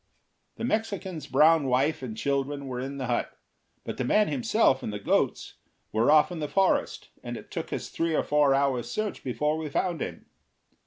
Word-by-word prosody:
The - - -7
Mexican's 200 - -2
brown 155 -1 +4
wife 135 +5 +1
and 115 -4 -6
children 140 +1 -1
were 125 -2 -4
in 135 +2 -5
the 130 - -3
hut, 120 -1 -2 0.5
but - - -6
the - - -1
man 210 +11 +3
himself 140 - +2
and - - -4
the 105 - -4
goats 100 - 0 0.3
were 110 +4 +2
off 155 +3 +5
in 175 - -5
the 150 - -2
forest, 195 +4 +1
and 120 -1 -6
it 105 - -12
took - - -5
us - - -4
three 165 -1 -1
or - - +2
four 145 -2 +3
hours' 130 -4 0
search 215 - -3
before 150 +5 -1
we 155 -1 -4
found 170 +2 -1
him. - - -5
140 Hz, 195 wpm, -27 LUFS, 130-165 Hz, 0.5 s, off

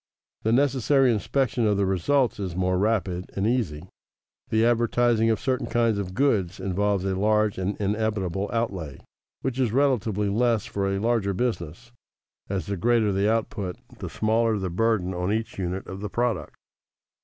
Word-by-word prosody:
The 110 - 0
necessary 135 0 +3
inspection 120 +1 0
of 105 -1 +2
the 100 - +2
results 115 +8 +1
is 95 -4 -4
more 90 0 +1
rapid 95 -4 0
and 100 - 0
easy. 110 -11 0 0.7
The 110 +1 +3
advertising 120 -1 +2
of 110 - +1
certain 130 -2 -1
kinds 115 -3 +1
of 95 -2 -5
goods 105 -10 +1
involves 95 +1 0
a 95 - 0
large 105 +1 +2
and 95 +2 -2
inevitable 100 -2 -1
outlay, 95 - -2 0.5
which 130 -1 -2
is 125 -5 +2
relatively 115 -6 +1
less 115 +1 +1
for 100 -1 -2
a 100 - 0
larger 105 -2 0
business, 115 -1 -3 0.6
as 95 -5 -2
the 100 +1 -3
greater 115 +1 +2
the 100 +2 +2
output 105 -4 -2 0.2
the - - -5
smaller 110 0 +1
the 95 -3 -3
burden 100 -1 +1
on 90 +2 -1
each 110 -2 -3
unit 90 +1 -3
of 95 - -7
the 105 0 -4
product. 120 -2 -1
105 Hz, 165 wpm, -25 LUFS, 95-115 Hz, 0.7 s, necessary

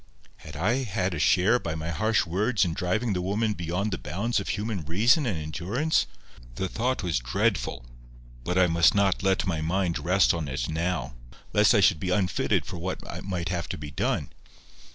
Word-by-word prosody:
Had 75 - -11
I 105 - +1
had 95 -6 -1
a 80 - -3
share, 95 +9 +4
by 85 -6 -4
my 80 +1 -4
harsh 110 +5 +1
words, 100 +5 +1
in 85 - -2
driving 100 +6 -1
the 90 - -1
woman 105 +4 0
beyond 90 +3 -2
the 95 - -3
bounds 100 - -1
of 95 - -5
human 105 -3 -2
reason 115 - +3
and 100 -8 -1
endurance? 95 - -1 0.5
The 95 - -2
thought 125 +3 -1
was 85 -8 0
dreadful. - - -1 0.6
But 90 +7 -1
I 95 - +6
must 85 +1 +4
not 100 -2 +2
let 95 +1 +1
my 85 -5 -1
mind 85 +1 0
rest 90 +2 +3
on 80 -3 -3
it 65 -2 -3
now, 85 -1 -2 0.4
lest 105 +3 +5
I 105 - +5
should 95 -3 +4
be 90 - -3
unfitted 90 -1 +1
for 90 - -7
what 90 +2 -5
might 90 -3 -3
have 90 -2 -3
to - - -4
be 75 -1 -7
done. - - -1
90 Hz, 195 wpm, -26 LUFS, 85-105 Hz, 0.6 s, I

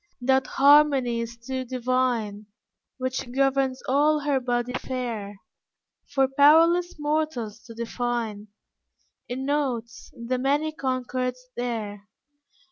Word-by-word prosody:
That 265 +1 +2
harmony 275 -4 +4
is 230 0 -6
too 260 +2 -4
divine, 245 -4 -1 0.5
Which 255 -1 -3
governs 270 0 +1
all 295 +3 +3
her 285 -2 +1
body 245 0 -1
fair, 230 -7 -4 0.8
For 270 -1 +4
powerless 325 +6 +5
mortals 295 -8 -2
to 230 -1 -11
define 235 -2 -3 0.8
In 260 +2 -4
notes 265 -5 -2
the 245 +2 -2
many 290 +4 +1
concords 255 -2 -3
there. 215 -4 -4
255 Hz, 105 wpm, -25 LUFS, 235-275 Hz, 0.8 s, powerless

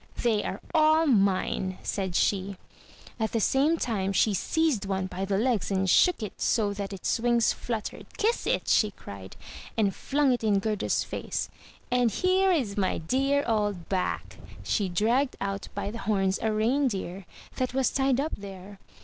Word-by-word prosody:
"They 225 -3 +2
are 190 - -4
all 315 0 +5
mine," 195 -5 +1
said 190 -3 -2
she. 195 0 +1 0.6
At 220 -1 -1
the 230 - +2
same 280 +9 +2
time 200 -8 -1
she 210 +2 +3
seized 300 - 0
one 190 -1 -1
by 185 +1 -4
the 195 0 0
legs 230 -1 +1
and 190 -1 0
shook 345 - +4
it 210 - -7
so 210 -4 +1
that 200 0 -5
its 195 +3 -1
wings 235 0 +3
fluttered. 225 -3 -5
"Kiss 450 +3 0
it!" - - 0
she 215 - +4
cried, 100 - -11 0.4
and 205 -3 +2
flung 280 +5 +1
it 240 - -3
in 210 -2 +3
Gerda's 210 0 0
face. - - -4 0.4
"And 245 -1 +3
here 370 - +2
is 245 - 0
my 190 -2 +1
dear 275 - +1
old 205 -6 -1
Bac." 185 -2 -2 0.3
She 200 -3 0
dragged 235 +9 +1
out 195 0 -3
by 200 0 -3
the 230 - -7
horns 195 -3 0
a 220 - +1
reindeer, 215 - -1 0.3
that 255 0 -2
was 265 -1 +2
tied 270 -1 +1
up 305 +3 -1
there. 195 0 -10
215 Hz, 170 wpm, -27 LUFS, 195-260 Hz, 0.6 s, all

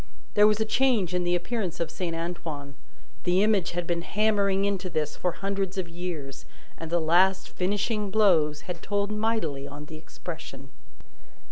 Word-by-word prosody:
There 210 0 +7
was 215 0 +2
a 220 - +2
change 225 -7 +2
in 180 0 +1
the 175 0 +2
appearance 180 -1 -2
of 170 - -2
Saint 170 -3 -3
Antoine; 165 -4 -5 0.5
the 180 +2 +3
image 210 -5 +2
had 175 0 -2
been 170 0 -1
hammering 200 0 +2
into 195 -2 -1
this 155 -3 -1
for 180 - 0
hundreds 195 -1 -2
of 185 -2 -1
years, 165 -6 -6 0.3
and 165 - -7
the 170 +1 +2
last 180 +4 +3
finishing 205 +3 -1
blows 175 -8 +3
had 180 -2 -6
told 205 0 -1
mightily 210 -11 -1
on 145 +1 -8
the 155 +1 -9
expression. 155 -4 -9
180 Hz, 165 wpm, -27 LUFS, 165-200 Hz, 0.5 s, There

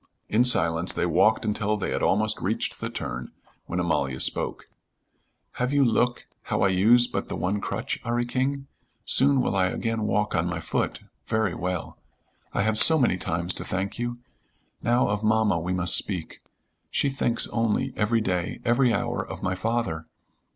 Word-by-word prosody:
In 115 +3 +4
silence 85 -7 +4
they - - 0
walked 95 +8 +3
until 105 0 0
they 100 - -3
had - - -1
almost 110 +2 +1
reached 105 +5 -2
the - - -2
turn, - - -5 0.4
when 90 - -2
Amalia 70 -7 -1
spoke. - - -1 1.0
"Have 125 +1 +1
you 140 -1 +3
look, 120 +1 +1 0.2
how - - 0
I 100 - +4
use 110 +6 +5
but - - -4
the - - -3
one 100 +3 -1
crutch, - - -3
'Arry 120 +1 0
King? 135 +3 -2 0.4
Soon 135 0 +3
will 125 - -1
I 95 -1 +3
again 115 +3 -2
walk 105 0 0
on 85 +1 +1
my 90 -2 -3
foot, - - -2 0.3
very 110 -4 0
well. 90 +1 -4 0.5
I 100 - 0
have 110 0 +1
so 160 - +8
many 120 - +2
times 85 +1 -2
to - - -7
thank 95 +4 -3
you. 120 0 -3 0.6
Now 120 +2 +2
of 105 +1 -2
mamma 110 -4 +2
we 85 +3 -3
must 90 -1 +1
speak. 90 -6 -3 0.5
She - - +1
thinks 135 -3 0
only, 115 -2 0
every 115 +2 +1
day, 90 -4 -2
every 120 +1 +3
hour, - - -1
of - - -9
my 90 - 0
father. 95 -5 -2
105 Hz, 175 wpm, -25 LUFS, 90-120 Hz, 1.0 s, so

